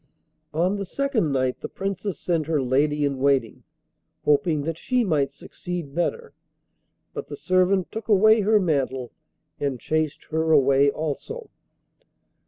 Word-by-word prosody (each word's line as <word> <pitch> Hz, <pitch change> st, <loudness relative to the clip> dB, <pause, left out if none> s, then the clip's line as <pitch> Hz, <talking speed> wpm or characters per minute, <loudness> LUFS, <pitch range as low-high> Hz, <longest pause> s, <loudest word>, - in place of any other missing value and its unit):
On 180 Hz, +5 st, +1 dB
the 200 Hz, -, -3 dB
second 240 Hz, -, 0 dB
night 130 Hz, -1 st, 0 dB
the -, -, -5 dB
Princess 195 Hz, -2 st, -4 dB
sent 165 Hz, -4 st, -1 dB
her 160 Hz, -2 st, +1 dB
lady 145 Hz, +3 st, +1 dB
in 140 Hz, -2 st, -2 dB
waiting, 135 Hz, -4 st, +1 dB, 0.6 s
hoping 150 Hz, +1 st, +2 dB
that 165 Hz, +1 st, -3 dB
she 250 Hz, -1 st, +1 dB
might 145 Hz, -8 st, +1 dB
succeed 170 Hz, 0 st, -7 dB
better, 460 Hz, -, -2 dB, 0.8 s
but -, -, -6 dB
the -, -, -7 dB
servant 185 Hz, 0 st, +2 dB
took 220 Hz, -1 st, -6 dB
away 215 Hz, +1 st, +5 dB
her 215 Hz, +1 st, +4 dB
mantle 135 Hz, -8 st, -1 dB, 0.5 s
and 140 Hz, -3 st, -2 dB
chased 155 Hz, +1 st, -1 dB
her 160 Hz, +1 st, +1 dB
away 140 Hz, -1 st, +5 dB
also. 160 Hz, -, -5 dB
160 Hz, 140 wpm, -24 LUFS, 140-195 Hz, 0.8 s, away